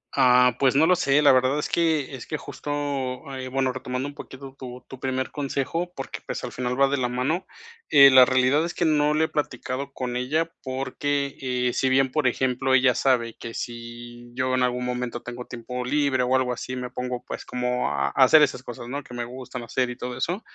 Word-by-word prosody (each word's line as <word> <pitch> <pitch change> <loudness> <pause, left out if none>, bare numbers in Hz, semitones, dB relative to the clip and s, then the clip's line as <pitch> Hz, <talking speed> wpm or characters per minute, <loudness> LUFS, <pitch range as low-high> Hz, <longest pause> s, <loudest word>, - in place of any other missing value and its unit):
Ah, 125 -1 +5
pues 135 -1 +3
no 155 +3 +5
lo 180 - +5
sé, 145 -4 +3
la 145 - +6
verdad 130 +3 +2
es - - -2
que 160 -5 0
es 125 - -9
que 155 - -3
justo, 145 - -7 0.6
eh, 130 -1 -5
bueno, 130 0 0
retomando 130 +1 -4
un 145 - -9
poquito 135 -2 -10
tu 125 -1 -9
tu 130 - -10
primer 130 0 -2
consejo, 145 +5 -2
porque, 135 - -6
pues, - - -5
al - - -7
final 125 +1 -3
va 140 - +6
de 140 - 0
la 125 -2 0
mano. 130 +9 -1 0.4
Eh, 140 -1 +9
la 130 -1 +8
realidad 130 +4 +3
es 170 - -3
que 175 - 0
no 150 -1 +3
lo 155 +1 +2
he - - +2
platicado 140 -2 -3
con 125 -2 -4
ella 150 +7 0
porque, 140 +1 -2
eh, 125 -2 0
si 130 - +1
bien, 135 0 +3
por 155 0 0
ejemplo, 130 +1 0
ella 130 -1 +4
sabe 120 -4 +1
que 115 - -8
si 120 +1 -8
yo 130 +1 0
en 130 - +2
algún 125 0 0
momento 125 -1 -3
tengo 125 0 -7
tiempo 125 +1 -6
libre 140 -1 +1
o 125 +1 +2
algo 125 -1 0
así, 130 +1 -5
me 125 0 -4
pongo, 125 0 -4
pues, - - -6
como 125 0 -1
a 70 -1 0
a 100 - +3
hacer 155 +4 +7
esas 135 -3 +1
cosas, 120 -1 -8
¿no?, 140 +3 -4
que 125 - -13
me 120 -1 -3
gustan 125 0 -8
hacer 125 +2 -1
y 125 - -6
todo 125 -1 -5
eso. 175 - -2
130 Hz, 225 wpm, -25 LUFS, 125-140 Hz, 0.6 s, Eh